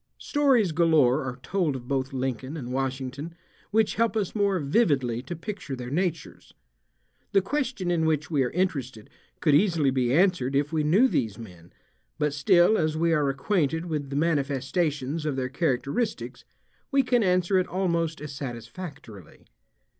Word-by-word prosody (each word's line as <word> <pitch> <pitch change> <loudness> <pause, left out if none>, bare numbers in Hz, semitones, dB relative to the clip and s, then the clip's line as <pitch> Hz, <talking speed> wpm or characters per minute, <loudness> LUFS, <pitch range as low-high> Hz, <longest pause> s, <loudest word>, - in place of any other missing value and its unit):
Stories 265 - +2
galore 155 -6 +3
are 125 -1 -5
told 175 -4 0
of 125 -2 -8
both 135 -1 -1
Lincoln 130 +2 -3
and 125 -4 -6
Washington, 135 +4 -3 0.3
which 220 0 +2
help 230 -1 +2
us 200 -4 -1
more 200 -2 +1
vividly 140 - +1
to 135 +7 -6
picture 170 -5 -6
their 125 0 -7
natures. 170 0 -3 0.8
The 195 - +5
question 240 -6 -2
in 160 -2 +1
which 155 +1 -1
we 145 -3 +2
are 125 - +1
interested 135 - -3 0.3
could 150 - +3
easily 160 -4 +3
be 125 -2 +1
answered 155 -5 +2
if 145 +3 0
we 155 -1 +1
knew 190 +13 +4
these 110 - -1
men, 90 -7 -12 0.5
but 150 -1 0
still 175 +8 +4
as 155 -1 0
we 165 +1 +2
are 150 -3 +2
acquainted 160 +2 0
with 150 -5 -3
the 140 - -5
manifestations 145 0 -1
of 150 -3 -1
their 130 -1 -2
characteristics 140 - -2 0.4
we 275 -2 +3
can 245 -1 +2
answer 185 -1 +2
it 185 - -1
almost 170 -3 -1
as 150 -2 -7
satisfactorily. 125 - -9
150 Hz, 160 wpm, -26 LUFS, 135-180 Hz, 0.8 s, The